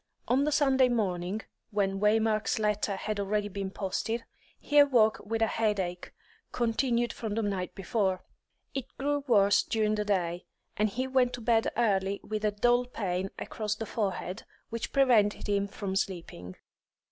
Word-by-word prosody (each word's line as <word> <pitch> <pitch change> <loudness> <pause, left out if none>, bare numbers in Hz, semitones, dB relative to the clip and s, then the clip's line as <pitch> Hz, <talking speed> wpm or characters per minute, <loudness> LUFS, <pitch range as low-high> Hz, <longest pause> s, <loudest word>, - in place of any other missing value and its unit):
On 265 +3 +3
the 300 - +1
Sunday 270 -3 +4
morning 195 -3 -1 0.3
when 195 -2 0
Waymark's 215 +1 +2
letter 210 -2 0
had 210 +2 -3
already 205 +1 -1
been 195 -1 -4
posted 210 +4 -3 0.4
he 295 0 +3
awoke 240 -7 +5
with 225 +2 -1
a - - +6
headache, 205 -6 -1 0.4
continued 240 0 0
from 215 -3 -4
the 225 - 0
night 195 -3 -2
before. 190 -1 -1 0.5
It 270 -3 -3
grew 290 +1 -1
worse 205 -4 +5
during 215 -1 0
the 210 0 0
day, 180 -3 -1 0.3
and 215 +1 +2
he 255 +6 -2
went 260 -2 +2
to 245 - -5
bed 225 -1 +2
early 200 -4 +1
with 215 0 -4
a 210 - +3
dull 240 +4 +2
pain 190 -5 -2
across 215 -1 -3
the 225 +1 -5
forehead, 195 -2 -3 0.3
which 230 0 -4
prevented 240 -7 +3
him 200 -1 +1
from 195 -1 -5
sleeping. 165 - -4
215 Hz, 160 wpm, -29 LUFS, 195-235 Hz, 0.5 s, a